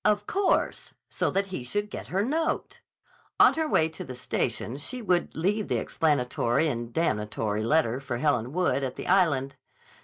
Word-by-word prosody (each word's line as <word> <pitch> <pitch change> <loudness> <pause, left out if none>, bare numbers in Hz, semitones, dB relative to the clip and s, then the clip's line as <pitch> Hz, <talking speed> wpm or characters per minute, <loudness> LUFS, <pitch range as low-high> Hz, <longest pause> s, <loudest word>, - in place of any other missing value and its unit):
Of 210 -1 +2
course; 395 - 0 0.2
so - - 0
that 195 +1 0
he 185 -9 -5
should 205 +11 -2
get - - -6
her 195 +3 0
note! 320 +5 -1 0.6
On - - +7
her 320 -1 -1
way 160 - +3
to 160 - -8
the 130 - -8
station 125 -1 -2
she 245 - -4
would 180 -6 0
leave 200 +6 0
the - - 0
explanatory 140 -2 +1
and 120 -3 -4
damnatory 105 -7 -1
letter 125 0 +2
for 130 -3 -4
Helen 120 0 +1
Wood 150 -5 +1
at 130 - -3
the - - -6
Island. 145 -8 +2
155 Hz, 175 wpm, -27 LUFS, 125-195 Hz, 0.6 s, On